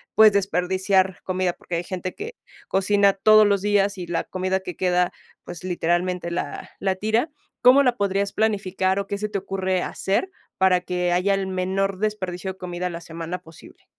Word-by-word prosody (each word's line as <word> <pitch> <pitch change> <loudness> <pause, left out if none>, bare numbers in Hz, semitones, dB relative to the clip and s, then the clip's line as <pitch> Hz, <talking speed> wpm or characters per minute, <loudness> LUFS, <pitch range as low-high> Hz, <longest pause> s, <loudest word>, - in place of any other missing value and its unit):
pues, 215 -2 +7
desperdiciar 190 0 +1
comida, 185 -1 -1
porque 175 - -6
hay 170 - -1
gente 185 -1 -4
que 460 +4 -7 0.3
cocina 200 +1 +3
todos 215 +2 +6
los 200 -2 +2
días 205 -1 +2
y 180 - -5
la 170 0 -2
comida 185 +1 -1
que 180 -3 -7
queda, 180 -1 +1 0.3
pues, 175 0 -9
literalmente, 175 0 -1
la 170 - -4
la 190 -1 0
tira. 220 - 0 0.3
¿Cómo 260 +3 +7
la 250 -2 +2
podrías 200 0 0
planificar 195 -3 0
o 200 - -4
qué 200 - -3
se 210 +1 -2
te 200 - -2
ocurre 190 -1 -1
hacer 200 - -1 0.3
para 185 -1 +4
que 180 -1 -1
haya 185 +3 +2
el 195 -1 -2
menor 190 +1 -1
desperdicio 190 -3 -2
de - - -24
comida 180 0 -4
a - - -3
la 170 -1 -6
semana 165 +2 -6
posible? 165 -2 -16
190 Hz, 185 wpm, -23 LUFS, 180-200 Hz, 0.3 s, pues